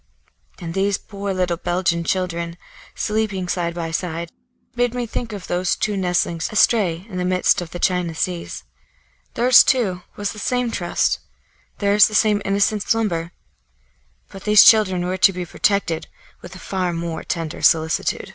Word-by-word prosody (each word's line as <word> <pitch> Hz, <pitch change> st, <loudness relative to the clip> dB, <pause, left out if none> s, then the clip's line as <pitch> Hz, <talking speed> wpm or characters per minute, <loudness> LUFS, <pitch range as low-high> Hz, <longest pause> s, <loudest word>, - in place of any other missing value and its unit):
And 165 Hz, -1 st, -6 dB
these 195 Hz, +1 st, +1 dB
poor 200 Hz, -1 st, -6 dB
little 180 Hz, -2 st, -1 dB
Belgian 175 Hz, -1 st, -1 dB
children, 170 Hz, -2 st, -2 dB, 0.4 s
sleeping 210 Hz, -4 st, -2 dB
side 170 Hz, -1 st, -2 dB
by 165 Hz, -1 st, -4 dB
side, 165 Hz, 0 st, -4 dB, 0.4 s
made 245 Hz, 0 st, 0 dB
me 245 Hz, -1 st, -2 dB
think 230 Hz, 0 st, -5 dB
of 200 Hz, -3 st, -7 dB
those 180 Hz, 0 st, 0 dB
two 210 Hz, -1 st, -1 dB
nestlings, 175 Hz, -3 st, -1 dB
astray 200 Hz, -5 st, +2 dB
in 185 Hz, -5 st, -6 dB
the -, -, -1 dB
midst 180 Hz, 0 st, +2 dB
of 175 Hz, -, -7 dB
the 175 Hz, -, -7 dB
China 180 Hz, -2 st, 0 dB
Seas. 175 Hz, +1 st, -4 dB, 0.7 s
Theirs, 245 Hz, +1 st, +7 dB
too, 205 Hz, -9 st, +1 dB
was 205 Hz, -1 st, -3 dB
the 210 Hz, -, -9 dB
same 250 Hz, +1 st, -1 dB
trust; 175 Hz, -5 st, 0 dB, 0.6 s
theirs 205 Hz, 0 st, +5 dB
the 215 Hz, -, -5 dB
same 210 Hz, -2 st, +3 dB
innocent 200 Hz, +2 st, +1 dB
slumber. 175 Hz, -7 st, -1 dB, 1.0 s
But 195 Hz, -2 st, -11 dB
these 210 Hz, -1 st, +7 dB
children 190 Hz, -5 st, +5 dB
were 185 Hz, +1 st, -2 dB
to 195 Hz, -, +5 dB
be 180 Hz, 0 st, -4 dB
protected 185 Hz, -2 st, -1 dB, 0.3 s
with -, -, -11 dB
a -, -, -9 dB
far 185 Hz, -2 st, -2 dB
more 165 Hz, -1 st, -4 dB
tender 165 Hz, -2 st, -4 dB
solicitude. 160 Hz, 0 st, +1 dB
185 Hz, 160 wpm, -21 LUFS, 170-210 Hz, 1.0 s, Theirs